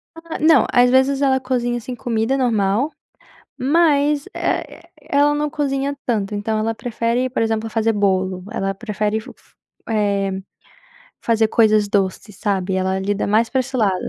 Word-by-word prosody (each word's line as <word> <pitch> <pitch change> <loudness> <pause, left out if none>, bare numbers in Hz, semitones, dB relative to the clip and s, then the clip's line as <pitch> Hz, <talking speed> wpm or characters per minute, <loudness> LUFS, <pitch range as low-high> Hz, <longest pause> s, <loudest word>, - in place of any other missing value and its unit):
Ah, 330 0 -7
não. 315 +1 +5
Às 245 0 +5
vezes 265 +2 +3
ela 265 -1 +3
cozinha 245 -2 -1
assim 245 +2 -6
comida 235 +1 -1
normal, 230 +1 +1 0.7
mas, 290 0 +2
eh - - 0
eh-eh, - - -16 0.2
ela 290 +1 +3
não 295 0 -1
cozinha 280 -2 -2
tanto, 210 -4 -1
então 215 +2 -1
ela 225 +1 -1
prefere, 235 +2 -1
por 240 - -1
exemplo, 225 0 -1
fazer 225 0 +1
bolo. 190 -3 0
Ela 195 0 -2
prefere 210 0 -2
f 220 - -10
f - - -21 0.3
eh, 200 -3 0 0.9
fazer 225 -1 +2
coisas 215 -2 +3
doces, 200 0 -1
sabe. 190 -2 -1
Ela 190 0 0
lida 200 +1 -1
mais 220 +3 +2
pra 265 - +1
esse 260 +1 -4
lado, 210 -5 +2
225 Hz, 160 wpm, -20 LUFS, 205-265 Hz, 0.9 s, não